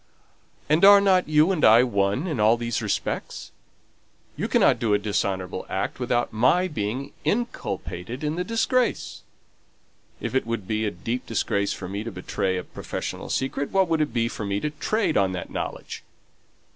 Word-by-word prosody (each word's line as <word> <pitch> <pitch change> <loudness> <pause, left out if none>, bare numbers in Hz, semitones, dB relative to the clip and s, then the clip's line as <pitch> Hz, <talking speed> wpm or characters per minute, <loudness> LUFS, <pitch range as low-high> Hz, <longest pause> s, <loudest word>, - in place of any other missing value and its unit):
and 155 +4 +2
are 200 0 +10
not 190 -4 +3
you 155 +4 +4
and 175 -5 -1
I 115 +3 +7
one 100 - 0
in 155 -10 -3
all 110 +2 +4
these 120 -1 -2
respects? - - -3 0.8
You - - -2
cannot - - +3
do 110 -3 +2
a - - +4
dishonourable 95 -3 -2
act 95 - -3
without 120 -2 0
my 170 +12 +3
being 125 - -4
inculpated 125 - -3
in 150 +1 -1
the 180 - -1
disgrace. 230 +4 0 1.0
If - - -4
it 130 -3 0
would 115 -5 -3
be 110 0 -1
a - - +1
deep 115 +7 -4
disgrace 100 -2 0
for 95 - -7
me 100 +3 -4
to 115 - -5
betray 95 0 -2
a 90 - -3
professional - - -6
secret, 135 +1 -2
what 195 -1 +2
would 160 -1 +2
it 150 - 0
be 115 -1 +1
for 115 - -6
me 100 0 -1
to 150 - -2
trade 215 +8 0
on 95 -2 +2
that 90 - -6
knowledge?" - - -5
120 Hz, 175 wpm, -24 LUFS, 100-155 Hz, 1.0 s, are